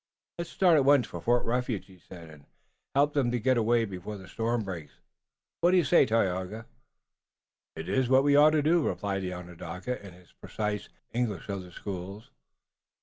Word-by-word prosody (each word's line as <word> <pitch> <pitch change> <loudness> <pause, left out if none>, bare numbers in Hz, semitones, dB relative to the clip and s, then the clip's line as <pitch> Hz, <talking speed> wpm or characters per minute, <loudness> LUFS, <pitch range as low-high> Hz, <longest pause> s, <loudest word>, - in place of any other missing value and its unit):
"Let's 170 - -4
start 175 -4 +4
at 140 - +3
once 140 -3 +5
for - - -8
Fort 120 +1 +2
Refuge," 120 -3 -1
he 95 -2 -18
said, 85 -3 -12
"and 75 -2 -16 0.5
help 145 +1 +3
them 135 -4 +1
to 120 0 -1
get 130 +3 +2
away 115 0 +2
before 100 +1 -7
the 95 -1 -12
storm 115 +4 -1
breaks. 85 -7 -7 0.7
What 175 - +4
do 185 - +4
you 175 - +4
say, 130 - +4
Tayoga?" 105 0 -1 1.1
"It 80 - -7
is 130 -2 +1
what 130 +1 +5
we 145 0 +4
ought 150 +1 +7
to 150 - +1
do," 165 +3 +3
replied 95 -4 -2
the 90 -1 -4
Onondaga, 90 +6 -6
in 100 -3 -10
his 90 -2 -19
precise 105 -1 -4 0.2
English 115 -6 -2
of 100 -1 -3
the 90 -1 -12
schools. 95 +3 -7
110 Hz, 190 wpm, -28 LUFS, 95-130 Hz, 1.1 s, ought